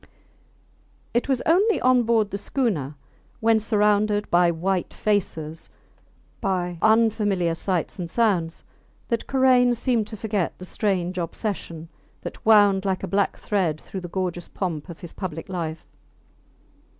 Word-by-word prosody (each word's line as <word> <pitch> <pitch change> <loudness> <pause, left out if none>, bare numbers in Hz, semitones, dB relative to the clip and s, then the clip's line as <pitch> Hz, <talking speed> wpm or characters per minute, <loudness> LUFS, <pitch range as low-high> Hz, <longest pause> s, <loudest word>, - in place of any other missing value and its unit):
It 240 +3 0
was 260 -2 +1
only 395 +7 +3
on 255 -1 +4
board 225 -3 +1
the 200 - -2
schooner, 185 - -1 0.4
when 225 0 +3
surrounded 210 -1 +1
by 175 0 +5
white 180 +2 -1
faces, 165 -7 -2 0.7
by 180 -4 -1
unfamiliar 210 -6 +3
sights 180 +1 -2
and 175 -2 -4
sounds, 180 -7 0 0.5
that 235 -3 -1
Karain 255 -2 +4
seemed 235 -3 0
to 220 - -8
forget 205 -4 -2
the 185 - -9
strange 185 -2 -1
obsession 170 -2 -4 0.4
that - - -8
wound 205 -3 +5
like 190 -2 -1
a - - -2
black 200 0 0
thread 180 -7 -1
through 190 - -7
the 175 - -6
gorgeous 175 -1 -3
pomp 170 -4 -4
of 170 - -10
his 175 - -9
public 165 -4 -6
life. 165 -3 -4
195 Hz, 140 wpm, -24 LUFS, 175-220 Hz, 0.7 s, by